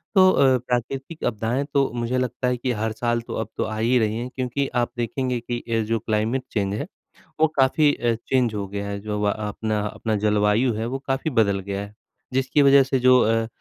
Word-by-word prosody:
तो 185 -1 +7
अ, 130 -2 +4
प्राकृतिक 125 +5 -4
आपदाएँ 115 +5 -1
तो 140 -1 +3
मुझे 120 +1 -1
लगता 125 0 -1
है 125 0 0
कि 125 +1 -2
हर 110 0 -2
साल 120 +1 -1
तो - - -8
अब 110 - -3
तो - - 0
आ 110 0 -4
ही 120 +3 +2
रही 110 0 0
हैं 120 +2 -4
क्योंकि 130 +2 -1
आप 120 -1 +1
देखेंगे 125 +1 -1
कि 120 0 -4
अ, 115 -1 -2
जो 115 +1 0
क्लाइमेट 110 +4 -1
चेंज 100 -2 -1
है, 105 - -3 0.5
वो 160 - +6
काफ़ी 145 +3 +4
अ, 120 -1 0
चेंज 125 -4 +1
हो 100 -1 -3
गया 100 0 -4
है 100 0 -4
जो 105 0 -3
व 105 - +2
आपना 105 0 -2
अपना 110 +1 -2
जलवायु 105 +4 +3
है 110 +2 -3
वो 135 +3 -3
काफ़ी 135 +3 -1
बदल 100 -5 +2
गया 100 +1 -4
है, 100 +1 -10 0.4
जिसकी 135 +3 +2
वजह 140 0 +7
से 135 0 0
जो 125 0 +6
अ, 115 0 +2
120 Hz, 220 wpm, -23 LUFS, 110-130 Hz, 0.5 s, तो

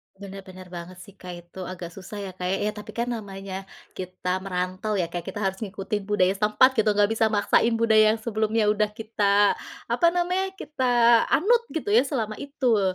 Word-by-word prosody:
Benar 195 0 -10
benar 185 -1 -12
banget 175 +1 -8
sih, 200 - -13
Kak. 180 -1 -8
Itu 175 +1 -9
agak 180 -2 -7
susah 195 +3 -8
ya, 195 - -5
Kak, 180 0 -6
ya? 195 +3 0
Tapi 210 -1 -10
kan, 235 +1 -2
namanya 195 -3 -6 0.3
kita 185 0 -3
merantau 185 +2 -3
ya, 180 -4 -1
Kak, 175 -1 -5
Kita 210 - -5
harus 190 0 -1
ngikutin 200 -1 -4
budaya 195 -3 +3
setempat, 210 +6 +4
gitu. 220 - +3
Nggak 205 0 +3
bisa 225 0 +2
maksain 220 +2 +2
budaya 220 -1 +4
yang 225 - -7
sebelumnya 220 -1 +1
udah 215 0 +2
kita, 205 -2 +2 0.3
apa 340 - +3
namanya, 365 +2 0
kita 245 - +3
anut, 470 +7 +3
gitu 310 -10 -2
ya, 240 +6 +5
selama 220 -6 -3
itu. 240 -9 0
210 Hz, 185 wpm, -25 LUFS, 190-230 Hz, 0.3 s, ya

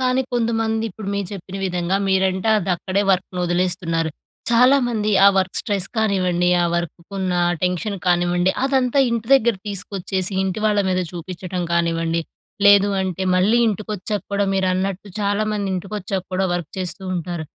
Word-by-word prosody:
కానీ 255 0 +2
కొంతమంది 225 -2 0
ఇప్పుడు 200 +1 -8
మీరు 200 -1 -2
చెప్పిన 195 0 -7
విధంగా, 180 +1 -1
మీరంటే 190 +1 +1
అది 190 -2 -3
అక్కడే 190 +3 -1
వర్క్‌ని 185 -1 -1
ఒదిలేస్తున్నారు. 175 -2 0 0.4
చాలా 250 +4 +6
మంది 215 -3 -1 0.2
ఆ - - +10
వర్క్ 190 -1 0
స్ట్రెస్ 200 -3 0
కానివ్వండి, 185 -5 +1
ఆ - - +2
వర్క్‌కున్న 180 +2 -3 0.3
టెన్షన్ 180 +3 -1
కానివ్వండి, 175 +1 +2
అదంతా 265 -1 +1
ఇంటి 230 -1 -2
దగ్గర 235 -3 +3
తీసుకొచ్చేసి, 195 -1 -2
ఇంటి 190 +2 -2
వాళ్ళ 210 -1 +2
మీద 185 0 +1
చూపిచ్చడం 180 +1 -5
కానివ్వండి, 165 -1 0 0.5
లేదు 205 0 +6
అంటే 190 -1 -3
మళ్ళీ 210 +6 +3
ఇంటికొచ్చాక 210 -1 -3
కూడా 200 0 +1
మీరన్నట్టు 190 +1 -1
చాలామంది 205 0 -1
ఇంటికొచ్చాక 195 0 -4
కూడా 190 - +1
వర్క్ 175 -4 -4
చేస్తూ 185 +1 -4
ఉంటారు. 170 -1 -4
190 Hz, 145 wpm, -21 LUFS, 180-210 Hz, 0.5 s, ఆ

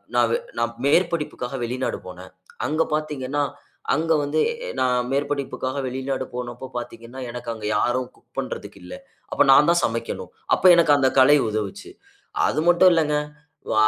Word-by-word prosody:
நான்வே 115 -1 +3 0.2
நான் 115 0 0
மேற்படிப்புக்காக 150 -4 0
வெளிநாடு 125 +2 -2
போனேன். 90 0 -10 0.3
அங்க 155 +2 0
பார்த்தீங்கன்னா, 145 -2 -1 0.5
அங்க 165 +1 -1
வந்து 145 +2 -1 0.3
எ - - -4
நான் 125 -1 +1
மேற்படிப்புக்காக 140 -1 -2
வெளிநாடு 130 +1 -3
போனப்போ 125 +1 -6
பார்த்தீங்கன்னா. 120 +1 -8
எனக்கு 120 0 -7
அங்க 110 -2 -8
யாரும் 125 +2 0
குக் - - -30
பண்ணுறதுக்கு 105 -6 -6
இல்ல. 90 - -8 0.4
அப்ப - - +4
நான் 150 +4 +6
தான் 170 - +2
சமைக்கணும். 115 -5 -4 0.2
அப்ப - - -5
எனக்கு 165 -3 +5
அந்த 130 -1 +3
கலை 145 +3 +7
உதவுச்சு. 110 - -4 0.6
அது - - 0
மட்டும் 180 +1 +6
இல்லங்க. 150 -2 +2 0.6
வ - - +1
130 Hz, 145 wpm, -23 LUFS, 120-150 Hz, 0.6 s, கலை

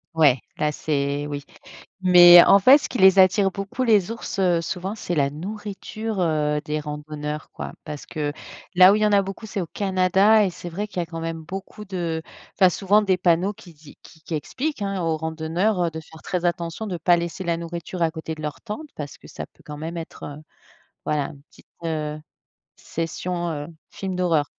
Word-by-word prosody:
Ouais 145 -5 +5 0.2
là 150 0 +1
c'est 145 -1 -1
oui, 145 -1 -5 0.6
mais 175 -1 +9
en 200 - +7
fait, 255 +8 +8
ce 295 - -3
qui 250 - -4
les 190 0 +7
attire 195 +1 +5
beaucoup 200 +6 -4
les 215 -5 +3
ours, 230 -3 -6
heu, 175 -3 +3
souvent 185 +5 -4
c'est 175 -5 -4
la 140 -2 +2
nourriture, 210 +4 -5
heu, 150 -3 +1
des 150 0 -1
randonneurs, 150 0 -6
quoi. - - -7
Parce 150 -2 -7
que, 150 -2 -3 0.4
là 185 +2 +8
où - - +4
il - - -1
y 215 - +4
en 210 - +2
a 200 - +5
beaucoup, 195 +3 -7
c'est 195 -3 -3
au - - -4
Canada 195 +2 +3
et 190 - 0
c'est 175 - -8
vrai 195 +5 -4
qu'il 200 - -9
y - - +1
a - - -5
quand 165 0 -7
même 165 -1 -4
beaucoup 195 +4 -8
de 170 -4 -3 0.4
tu 195 - -2
as - - +9
souvent 195 +3 +3
des 195 -3 +2
panneaux 180 +3 +2
qui 175 - -15
dit 150 -1 -16
qui 160 - -17
qui - - -34
qui 160 - -6
expliquent, 265 - -3
hein, 195 -1 -2
aux 165 -2 0
randonneurs 165 +4 -1
de 160 - -7
faire 160 0 -12
très 180 -2 -3
attention 175 +4 -2
de 180 -4 -4
pas 175 +2 +4
laisser 170 +1 -4
la 170 -2 0
nourriture 170 +1 -5
à 165 - +3
côté 160 0 -6
de 155 - -10
leur 150 -1 -5
tente 230 +8 -7
parce 145 -2 -6
que - - -16
ça - - -7
peut, - - -25
quand 150 -1 -8
même, 165 +3 -5
être, 165 - -8
heu, 145 +1 -8 0.6
voilà, 150 -2 0
une 140 -3 -13
petite, - - -22 0.2
heu, 155 -1 -3 0.6
session, 170 +1 -4
heu, 145 -2 -4 0.2
film 190 -2 -5
d'horreur. 165 -5 +2
175 Hz, 215 wpm, -23 LUFS, 155-195 Hz, 0.6 s, mais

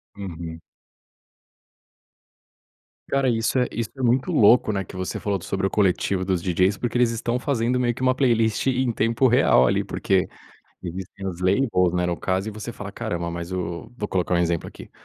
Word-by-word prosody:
Uhum. 85 -4 -7 2.5
Cara, 135 -1 +2
isso 115 +2 0
é 125 - +2
isso 115 -1 -3
é - - -5
muito 125 +7 +2
louco, 115 -4 +5
né, 95 -1 -1
que 95 - -13
você 95 -1 -4
falou 100 -3 -2
sobre 95 +3 -2
o - - +1
coletivo 95 -1 +1
dos 95 -2 0
DJs, 95 +3 +2
porque 120 0 -2
eles 120 -1 +4
estão 120 +2 -2
fazendo 125 -2 0
meio 120 -1 +1
que - - -9
uma 130 0 +3
playlist 115 -4 +1
em 130 -1 +1
tempo 115 +3 +2
real 115 - +5
ali, - - +2
porque 95 -2 0 0.6
existem 95 +2 -7
as 90 -2 -6
lane 100 +9 +2
holes, 90 -1 +2
né, 90 0 +1
no 90 -1 -1
caso, 95 +4 -1
e - - -3
você 110 +3 -7
fala: 105 -3 -7
"Caramba, 85 -3 -4
mas 85 +1 -6
o", 85 -2 -4
vou 105 -3 -4
colocar 90 -1 0
um - - +3
exemplo 85 -1 0
aqui, - - -11
100 Hz, 190 wpm, -23 LUFS, 90-120 Hz, 2.5 s, louco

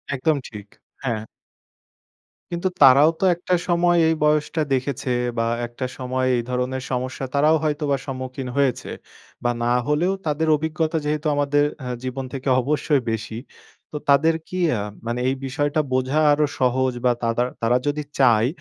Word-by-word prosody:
একদম 155 +4 +1
ঠিক। 105 -2 -10 0.4
হ্যাঁ। 115 -4 -2 1.3
কিন্তু 175 +2 -1
তারাও 140 +3 +8
তো - - -3
একটা 180 +1 -3
সময় 175 0 +3
এই 160 - +2
বয়সটা 150 +1 +1
দেখেছে 135 0 -2 0.3
বা 115 - +2 0.2
একটা 120 +2 -5
সময় 130 0 -1
এই 120 - +1
ধরনের 125 +1 -2
সমস্যা 130 +1 -3
তারাও 150 +3 +4
হয়তোবা 150 -2 0
সম্মুখীন 130 -1 -5
হয়েছে। 135 -4 0 0.5
বা 120 - +2
না 120 +1 +2
হলেও 170 +6 +1
তাদের 155 +1 0
অভিজ্ঞতা 160 +1 -1
যেহেতু 150 +1 -1
আমাদের 145 0 +2 0.2
অ্যা 125 -1 -4
জীবন 130 +1 -4
থেকে 135 0 -5
অবশ্যই 145 +1 +1
বেশি। 110 0 -4 0.5
তো - - -9
তাদের 160 +3 +5
কি 185 - -6 0.2
আ - - -2 0.3
মানে 120 +1 -2
এই 135 - +1
বিষয়টা 145 +3 -1
বোঝা 130 +4 +1
আরো 150 +1 +3
সহজ 130 0 +2
বা 125 - +5
তাদার 115 +2 +1
তারা 120 +2 +3
যদি 150 +1 -1 0.2
চায় 120 -3 +5
135 Hz, 155 wpm, -22 LUFS, 125-150 Hz, 1.3 s, তারাও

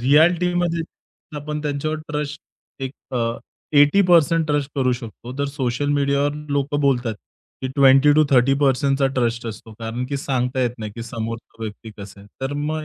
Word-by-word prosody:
रिॲलिटीमध्ये 170 +4 +3 0.5
आपण 150 +1 -4
त्यांच्यावर 150 +2 -2
ट्रस्ट 150 -1 -3 0.4
एक 130 - -2 0.2
अ, - - +1 0.6
80% 165 0 +5
ट्रस्ट 145 -1 0
करू 130 -2 +2
शकतो. 120 0 -7
तर 140 - +1
सोशल 135 -1 -2
मीडियावर 140 0 +1
लोकं 145 +1 0
बोलतात, 125 -5 +1 0.5
की 130 - -1
20-30% 135 -1 +4
ट्रस्ट 120 -2 0
असतो. 110 0 -8
कारण, 115 +2 -4
की 140 +1 -3
सांगता 130 -2 -1
येत 120 -1 -2
नाही, 105 -2 -6
की 115 - -6
समोरचा 115 0 -6
व्यक्ती 110 +1 -7
कसा 100 0 -10
आहे. 100 - -15
तर 135 +2 -2
मग 155 0 -2
140 Hz, 145 wpm, -22 LUFS, 120-150 Hz, 0.6 s, 80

